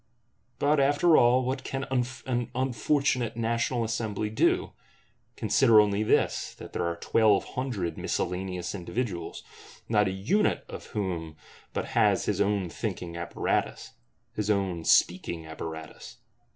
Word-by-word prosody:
But, 145 +1 +2
after 145 +4 +4
all, 125 0 +5
what 130 +1 -2
can 135 0 -3 0.4
an 120 -2 -1
unfortunate 130 -2 0
National 115 +1 0
Assembly 110 -2 -2
do? 110 - +2 0.6
Consider 110 -2 +5
only 105 -1 +3
this, 110 - +1
that - - -11
there 85 - -1
are 85 - -2
Twelve 105 +3 +3
Hundred 120 -10 -3
miscellaneous 90 0 -2
individuals; 95 -2 -4 0.4
not 105 -2 +3
a - - 0
unit 105 - +1
of - - -9
whom 90 -8 -3 0.4
but - - -3
has - - +3
his - - 0
own 100 -2 +1
thinking 85 +1 -5
apparatus, 85 0 -2 0.4
his 105 -1 -2
own 95 -5 0
speaking 85 -2 +2
apparatus! 80 0 -8
105 Hz, 125 wpm, -28 LUFS, 90-125 Hz, 0.6 s, all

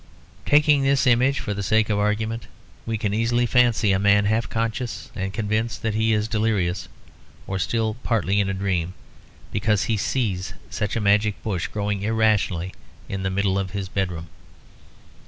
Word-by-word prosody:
Taking 150 -1 +5
this 135 0 +2
image 130 +2 +3
for 105 - -3
the 100 - -4
sake 110 +2 +2
of 105 - +1
argument, 110 +2 -1 0.4
we 115 -1 -1
can 105 -2 -1
easily 120 +2 +2
fancy 120 -4 +3
a 95 - +2
man 100 0 +4
half 110 +1 +1
conscious 115 +1 -3
and 95 -2 -3
convinced 110 +2 -2
that 110 -1 0
he 110 +1 +1
is 105 0 +1
delirious, 100 -5 0 0.6
or 95 0 -3
still 110 +3 0
partly 100 -3 +1
in 100 -1 +1
a - - -1
dream, 95 -3 -1 0.6
because 105 0 +1
he 110 - 0
sees 100 -5 -1 0.2
such 105 -1 -2
a - - +1
magic 105 +1 +2
bush 95 -5 -2
growing 105 -1 -2
irrationally 105 -5 +1 0.3
in 95 -1 -4
the 95 - -1
middle 95 0 +1
of 95 -1 -4
his 95 -2 -4
bedroom. 90 -5 -3
105 Hz, 170 wpm, -23 LUFS, 95-115 Hz, 0.6 s, Taking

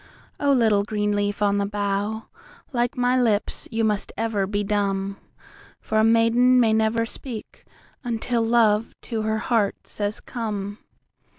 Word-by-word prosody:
O 285 -1 +2
little 220 -6 +3
green 210 0 -1
leaf 205 0 -1
on 200 0 +2
the 200 - +1
bough, 205 +1 -2 0.5
like 240 0 0
my 250 0 +2
lips 220 -4 0
you 225 -1 -1
must 210 -2 0
ever 215 -3 0
be 205 +1 -1
dumb, 195 -1 -1 0.6
For 220 - -1
a - - +4
maiden 230 +3 +4
may 225 -3 +4
never 220 +1 +2
speak 230 -1 -9 0.4
until 235 0 -1
love 225 -1 +2
to 225 -3 -3
her 220 0 0
heart 215 -2 0
says 205 0 -3
"Come." 210 -4 -5
220 Hz, 150 wpm, -24 LUFS, 205-230 Hz, 0.6 s, a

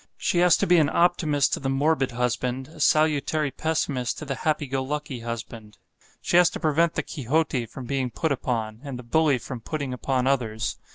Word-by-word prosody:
She 175 - 0
has 175 -1 +5
to - - +1
be 175 0 +5
an 150 -3 +4
optimist 160 -5 +2
to - - 0
the 135 - -2
morbid 140 0 +1
husband, 125 +2 -2
a 160 - -14
salutary 155 -1 +2
pessimist 140 -6 -1
to 155 - -7
the 135 - -2
happy 155 +2 -1
go 135 0 -2
lucky 145 -2 -4
husband. 115 -2 -7 0.5
She 175 - +3
has 175 -1 +6
to - - -7
prevent 160 +1 +2
the - - -1
Quixote 135 -2 -1
from 125 +3 -9
being 130 0 -1
put 160 +6 -2
upon, 115 -5 -2
and 140 -3 -6
the 125 - -9
bully 150 +3 +2
from 125 -1 -7
putting 140 +1 -4
upon 130 0 -1
others. 115 -5 -1
135 Hz, 195 wpm, -25 LUFS, 125-155 Hz, 0.5 s, has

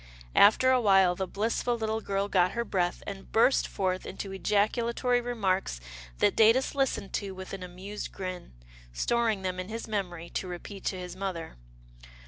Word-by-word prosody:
After 240 +5 +6
a 255 -1 +4
while, 195 -4 +5
the 190 +1 -3
blissful 230 +4 -1
little 220 0 -1
girl 200 -1 -1
got 185 -2 +2
her 235 0 -1
breath 175 -4 -1
and 195 -1 -8
burst 235 +4 +4
forth 185 -1 -1
into 195 +1 -6
ejaculatory 235 +5 +1
remarks 195 - -1 0.4
that - - +3
Datus 230 +4 +4
listened 270 -8 -1
to 195 -2 -3
with 190 +1 -8
an 195 - -5
amused 185 +3 -7
grin, 185 - -6 0.4
storing 225 - 0
them 185 -1 -2
in 185 +2 -5
his 225 +1 -5
memory 180 -6 -3
to 185 - -3
repeat 180 +2 -8
to 190 - -1
his 180 -1 -7
mother. 185 -4 -4
195 Hz, 165 wpm, -29 LUFS, 185-225 Hz, 0.4 s, After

